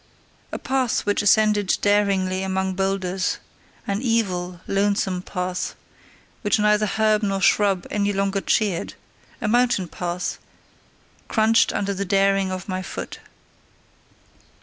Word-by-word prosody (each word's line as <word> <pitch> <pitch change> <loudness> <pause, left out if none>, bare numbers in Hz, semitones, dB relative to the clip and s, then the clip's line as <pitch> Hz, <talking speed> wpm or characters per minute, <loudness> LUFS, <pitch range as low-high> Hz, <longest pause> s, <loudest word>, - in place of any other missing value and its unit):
A - - -3
path 260 -3 0
which 205 +1 +1
ascended 210 -1 +3
daringly 195 -2 +2
among 190 0 -1
boulders, 190 -1 -1 0.5
an 200 +2 -2
evil, 185 -8 -1
lonesome 195 -2 0
path, 180 -1 -3 0.7
which 205 -2 +2
neither 210 0 +3
herb 215 +1 +2
nor 195 -2 0
shrub 195 -1 +3
any 205 -1 +1
longer 195 0 0
cheered, 200 -6 0 0.5
a - - -1
mountain 240 -5 +2
path, 175 +1 -4 0.9
crunched 220 +1 +3
under 200 0 -1
the 195 +1 -2
daring 195 0 +2
of 185 0 -5
my 185 -1 -2
foot. - - -7
195 Hz, 120 wpm, -23 LUFS, 185-210 Hz, 0.9 s, ascended